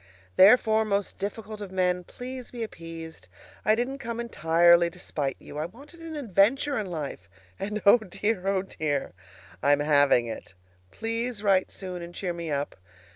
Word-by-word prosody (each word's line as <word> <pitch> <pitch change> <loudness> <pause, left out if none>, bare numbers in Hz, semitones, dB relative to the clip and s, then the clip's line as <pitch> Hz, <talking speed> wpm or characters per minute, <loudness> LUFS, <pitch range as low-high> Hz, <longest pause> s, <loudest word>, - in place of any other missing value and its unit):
Therefore, 220 +2 +6
most 200 -2 -1
difficult 210 +1 -5
of 200 -2 -6
men, 180 -1 +1
please 250 +5 -8
be 240 -2 -5
appeased. 165 - -9 0.4
I 215 - +4
didn't 255 +4 -2
come 235 -2 -5
entirely 170 -5 +4
to 175 - -16
spite 145 -6 -3
you. 150 - -8
I 155 - -2
wanted 280 - -15
an 330 -1 -7
adventure 265 +3 +2
in 210 - -3
life, 145 - -6 0.3
and, 210 +2 -3
oh 200 +4 +8
dear! 205 -1 -2
oh 195 -1 +1
dear! 145 - -2 0.5
I'm 145 0 +4
having 145 -5 +4
it! 110 -5 -8 0.3
PLEASE 230 - -3
write 195 -2 +3
soon, 185 -2 -6
and 170 0 -9
cheer 180 -3 -2
me 170 -1 -5
up. 145 -1 -2
195 Hz, 165 wpm, -27 LUFS, 165-225 Hz, 0.5 s, oh